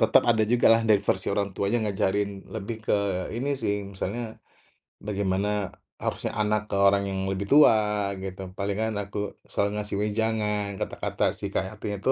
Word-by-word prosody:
tetep -, -, +5 dB
ada 110 Hz, -1 st, +3 dB
jugalah 115 Hz, -1 st, +6 dB
dari 105 Hz, -2 st, +5 dB
versi 95 Hz, -, +1 dB
orang 100 Hz, -1 st, 0 dB
tuanya 100 Hz, +4 st, +1 dB
ngajarin 100 Hz, +1 st, +1 dB, 0.3 s
lebih 110 Hz, +1 st, -4 dB
ke -, -, +1 dB, 0.4 s
ini 130 Hz, +4 st, -2 dB
sih 100 Hz, -, +1 dB, 0.2 s
misalnya, 100 Hz, +4 st, -3 dB, 0.9 s
bagaimana 100 Hz, -1 st, 0 dB, 0.6 s
harusnya -, -, -2 dB
anak 105 Hz, 0 st, +2 dB
ke -, -, 0 dB
orang 100 Hz, 0 st, +4 dB
yang 95 Hz, -, -2 dB
lebih 95 Hz, +1 st, -2 dB
tua 145 Hz, -5 st, +8 dB, 0.5 s
gitu, 95 Hz, 0 st, -6 dB, 0.2 s
palingan 100 Hz, +3 st, -1 dB
aku 100 Hz, +1 st, -7 dB, 0.3 s
selalu 100 Hz, -, +1 dB
ngasih 105 Hz, -1 st, -4 dB
wejangan 105 Hz, -1 st, 0 dB
kata-kata -, -, -3 dB
supaya 95 Hz, +2 st, -3 dB
hatinya 105 Hz, -1 st, -4 dB
itu, 130 Hz, -, +2 dB
105 Hz, 155 wpm, -26 LUFS, 100-110 Hz, 0.9 s, tua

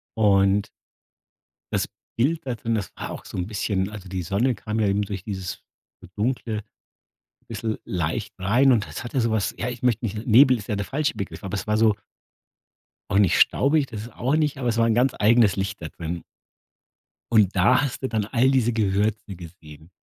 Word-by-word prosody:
und 100 Hz, -2 st, +3 dB, 1.0 s
das -, -, 0 dB, 0.3 s
Bild 150 Hz, +8 st, +1 dB
da 125 Hz, -2 st, -2 dB
drin, 115 Hz, 0 st, -2 dB
das 105 Hz, -3 st, -3 dB
war -, -, -6 dB
auch -, -, -8 dB
so -, -, -8 dB
'n 90 Hz, 0 st, -2 dB
bisschen 100 Hz, -2 st, -1 dB
also 100 Hz, -3 st, -9 dB
die 90 Hz, -1 st, -3 dB
Sonne 110 Hz, +9 st, +1 dB
kam 110 Hz, +1 st, -4 dB
ja 105 Hz, -, +2 dB
eben 100 Hz, +1 st, +1 dB
durch 100 Hz, -2 st, -5 dB
dieses 95 Hz, -4 st, -5 dB, 0.4 s
so 95 Hz, -, -12 dB
dunkle, 110 Hz, -1 st, -1 dB, 0.9 s
bisschen 110 Hz, -1 st, -3 dB
leicht 90 Hz, +4 st, -2 dB
rein 120 Hz, +9 st, +4 dB
und 110 Hz, -4 st, +1 dB
das -, -, -7 dB
hatte 125 Hz, +2 st, -1 dB
sowas, 110 Hz, -3 st, 0 dB
ja 120 Hz, -, -2 dB
ich 125 Hz, -1 st, -6 dB
möchte 125 Hz, -1 st, +1 dB
nicht 105 Hz, 0 st, -4 dB
Nebel 130 Hz, +3 st, +6 dB
ist 105 Hz, -3 st, -9 dB
ja 105 Hz, -, -1 dB
der 100 Hz, 0 st, -3 dB
falsche 150 Hz, +2 st, -1 dB
Begriff, 95 Hz, -6 st, -6 dB
aber 95 Hz, -, -4 dB
es -, -, -4 dB
war 105 Hz, 0 st, +1 dB
so 110 Hz, -1 st, +4 dB, 1.2 s
auch 100 Hz, -, +3 dB
nicht 100 Hz, -4 st, +4 dB
staubig, 140 Hz, +1 st, +3 dB
das 110 Hz, -5 st, -7 dB
ist 115 Hz, 0 st, -11 dB
auch 130 Hz, +5 st, 0 dB
nicht, 150 Hz, -3 st, 0 dB
aber 125 Hz, -2 st, 0 dB
es 115 Hz, -, -1 dB
war 115 Hz, -, +4 dB
'n 115 Hz, -, +3 dB
ganz 125 Hz, +3 st, +2 dB
eigenes 110 Hz, -2 st, +4 dB
Licht 95 Hz, +1 st, -3 dB
da 80 Hz, -, -4 dB
drin. 85 Hz, +1 st, -6 dB, 1.1 s
Und 105 Hz, -4 st, +4 dB
da 110 Hz, +9 st, +4 dB
hast 135 Hz, -2 st, -3 dB
du -, -, +1 dB
dann 110 Hz, -3 st, -1 dB
all 125 Hz, +4 st, +2 dB
diese 125 Hz, -3 st, +2 dB
Gewürze 105 Hz, -1 st, 0 dB
gesehen, 80 Hz, -2 st, -13 dB
110 Hz, 200 wpm, -24 LUFS, 95-120 Hz, 1.2 s, Nebel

